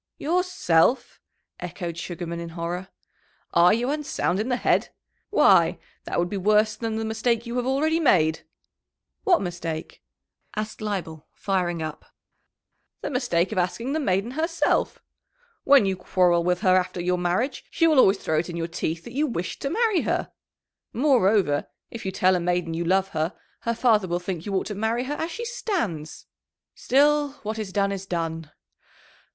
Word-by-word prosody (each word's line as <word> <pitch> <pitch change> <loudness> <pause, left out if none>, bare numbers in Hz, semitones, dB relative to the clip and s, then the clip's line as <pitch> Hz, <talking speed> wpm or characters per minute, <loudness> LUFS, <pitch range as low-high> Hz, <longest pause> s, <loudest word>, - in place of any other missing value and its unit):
"Yourself!" 300 - +1 0.4
echoed 170 -3 -5
Sugarman, 170 0 -5
in 170 0 -6
horror. 175 +2 -3 0.7
"Are 175 +1 +6
you 240 +5 +1
unsound 295 -10 -1
in 220 +4 -2
the 250 - +2
head? - - +1 0.4
Why, - - +5 0.3
that - - -3
would 175 - +2
be 200 - -4
worse 215 +2 +3
than 225 0 -3
the 220 0 -2
mistake 225 +1 0
you 235 +1 -5
have 245 0 -1
already 310 +5 +1
made!" 165 - +3 0.8
"What 360 - +4
mistake?" 170 -3 -5 0.5
asked 215 0 -4
Leibel, 175 -7 -4
firing 175 -4 -1
up. 155 -1 -6 1.0
"The - - -4
mistake 245 -10 0
of - - 0
asking 230 +9 -1
the 315 - 0
maiden 200 -3 0
herself. 330 +4 0 0.6
When 275 -6 +6
you 190 -1 0
quarrel 180 -2 +2
with 180 +1 0
her 185 -3 +4
after 180 -1 0
your 180 +1 0
marriage, 180 +10 -1
she 330 - +1
will 310 -4 +5
always 195 -5 +5
throw 155 -4 0
it 170 - -3
in 170 - -5
your 165 0 -2
teeth 165 -1 -3
that 235 - -10
you 295 +3 +1
wished 180 - -4
to 275 - -1
marry 430 -1 +2
her. - - -1 0.6
Moreover, 210 - +3 0.2
if 225 -4 -6
you - - -1
tell 185 0 +3
a - - +1
maiden 175 -1 -1
you 170 +1 -2
love 190 +2 +2
her, 160 +2 -2 0.2
her 230 0 -2
father 220 -5 +3
will 175 0 -1
think 180 0 -5
you 200 - -2
ought 190 - 0
to 210 - -4
marry 220 +4 -1
her 275 +3 -3
as 320 +3 -3
she 470 +6 -5
stands. 340 - -3 0.5
Still, 290 +1 +2
what 215 +1 -4
is 210 -3 -4
done 200 +1 +1
is 195 -1 -5
done." 165 -3 -3
195 Hz, 175 wpm, -25 LUFS, 175-250 Hz, 1.0 s, Are